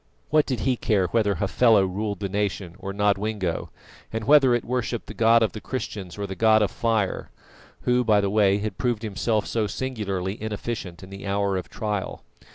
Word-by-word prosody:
What 155 0 +4
did 125 -6 -2
he 130 -2 +1
care 100 -5 +1
whether 105 -2 +2
Hafela 100 +3 +4
ruled 100 +2 -3
the 100 - -1
nation 100 -3 -2
or 95 +1 -5
Nodwengo, 100 -2 -1 0.4
and 110 0 -3
whether 135 -1 +6
it 120 - -2
worshipped 120 -1 -2
the - - -8
God 115 +2 +4
of 110 - +1
the 110 - -8
Christians 105 -8 -5
or 100 - -3
the 95 - -5
god 110 +2 +4
of 105 - 0
Fire 110 -4 -1 0.5
who, 125 0 +2
by 110 -3 +4
the 100 -1 0
way, 100 -2 +4
had 105 -2 -4
proved 120 -3 0
himself 110 +1 0
so 110 -2 -1
singularly 100 -6 -3
inefficient 105 -4 -5
in 95 - -11
the 100 +1 -8
hour 100 0 0
of 90 - -4
trial. 105 -4 -4
105 Hz, 190 wpm, -25 LUFS, 100-115 Hz, 0.5 s, whether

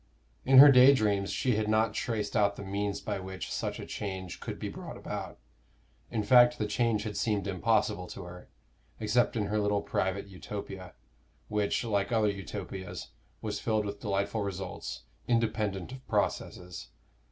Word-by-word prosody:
In 135 0 +6
her 140 +2 +12
day 130 +2 +8
dreams 100 -4 +1
she 125 -5 +1
had 110 0 0
not 110 +1 +2
traced 105 -3 -2
out 100 -2 +3
the - - -7
means 100 +1 -2
by 105 -3 -3
which 95 0 -6
such - - -3
a - - -6
change 95 -3 -5
could - - -6
be - - -4
brought - - -8
about; - - -6 0.7
in 110 -2 -1
fact, 120 +2 +6
the 105 - -1
change 105 0 +1
had 105 -2 -5
seemed 105 -3 0
impossible 100 -1 +1
to 95 - -8
her, 90 0 -11 0.5
except 115 +3 +2
in 105 -3 0
her 105 +1 0
little 105 -1 +1
private 95 +1 -1
Utopia, 95 -1 -8 0.5
which, 105 +1 0
like 100 -3 0
other 110 -3 +3
Utopias, 95 -1 -6 0.3
was - - -2
filled 110 -2 0
with 100 0 -5
delightful 100 +1 -1
results, 95 -2 -5 0.2
independent 110 -4 0
of 130 0 -10
processes. 90 -1 -2
105 Hz, 165 wpm, -30 LUFS, 100-110 Hz, 0.7 s, her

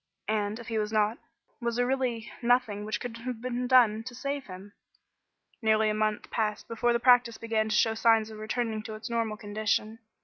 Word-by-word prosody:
And, 210 -1 0
if 235 -2 -10
he 225 -1 0
was 210 0 -2
not, 215 +1 +1 0.4
was 235 -1 -1
there 245 +1 +2
really 250 -3 -1
nothing 235 -4 +1
which 215 - -2
could 245 -2 -6
have 240 0 -5
been 250 +1 -3
done 235 -4 +5
to 250 -1 -7
save 280 +2 -3
him? 190 +2 -10 0.9
Nearly 220 -1 +3
a - - -1
month 215 0 -1
passed 215 -2 -1
before 230 +1 +1
the 235 - +2
practice 245 -2 +4
began 220 -1 -1
to 215 - +1
show 225 +1 +3
signs 225 -1 +3
of 215 - -9
returning 220 0 -2
to 220 0 -7
its 220 +2 -7
normal 225 -2 -1
condition. 215 +1 -1
225 Hz, 200 wpm, -28 LUFS, 215-240 Hz, 0.9 s, done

